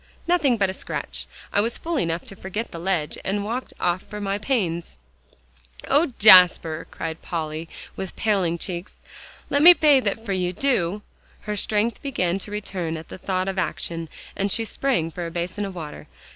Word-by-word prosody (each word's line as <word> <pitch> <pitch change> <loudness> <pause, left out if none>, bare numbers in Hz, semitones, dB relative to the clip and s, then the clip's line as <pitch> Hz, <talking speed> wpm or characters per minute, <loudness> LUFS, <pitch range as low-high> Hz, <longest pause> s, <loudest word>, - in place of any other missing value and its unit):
"Nothing 310 -9 +3
but 200 -2 +2
a 190 - -3
scratch. - - -5 0.3
I 205 - +4
was 230 +2 -1
fool 330 -3 -2
enough 165 -3 -1
to 195 - -10
forget 195 +5 -5
the 165 - -7
ledge, 170 -4 -1
and 200 +1 -1
walked 240 +4 -3
off 175 +1 +1
for 210 - -8
my 200 0 -1
pains" 175 - -1 0.9
"Oh, 290 +2 +3
Jasper!" 180 -5 +7
cried 160 0 -5
Polly, 160 -1 -4 0.3
with 190 -1 -6
paling 190 -6 +1
cheeks, 175 +1 -5 0.6
"let 285 - +3
me 350 +3 +11
bathe 290 -8 +4
it 200 - 0
for 225 -3 -3
you, 180 -1 -1
do;" 205 -5 0 0.4
her 210 0 -3
strength 210 +3 0
began 190 -10 -1
to 200 - -8
return 185 -6 -3
at 160 - -10
the - - -9
thought 185 0 -1
of 195 -1 -1
action, 165 -1 -3 0.3
and 200 0 -1
she 225 - +1
sprang 225 -10 0
for 170 +1 -4
a - - -5
basin 175 +4 -3
of 195 -2 -7
water. 155 -4 -8
190 Hz, 185 wpm, -24 LUFS, 170-220 Hz, 0.9 s, me